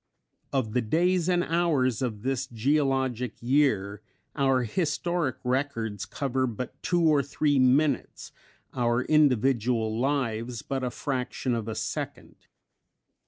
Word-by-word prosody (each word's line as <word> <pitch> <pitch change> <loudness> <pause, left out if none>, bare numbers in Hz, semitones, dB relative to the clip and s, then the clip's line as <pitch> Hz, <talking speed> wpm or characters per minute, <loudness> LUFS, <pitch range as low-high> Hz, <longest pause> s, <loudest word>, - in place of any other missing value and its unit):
Of 125 -6 -1
the 125 - +2
days 175 +9 +1
and 175 -1 +2
hours 155 -9 +1
of 110 -5 -3
this 130 0 -1
geologic 130 -1 0
year, 115 -6 +1 0.3
our 135 -2 +2
historic 165 - -1
records 125 -5 -2
cover 130 -2 -1
but 120 +2 -6
two 175 -2 +1
or 155 -3 +4
three 145 +1 +1
minutes, 135 +2 +1 0.4
our 120 0 +1
individual 125 -6 +2
lives 120 -4 -1
but 135 -1 -3
a 125 - 0
fraction 125 0 -3
of 115 -2 -2
a 110 - -3
second. - - -6
130 Hz, 120 wpm, -27 LUFS, 120-145 Hz, 0.4 s, or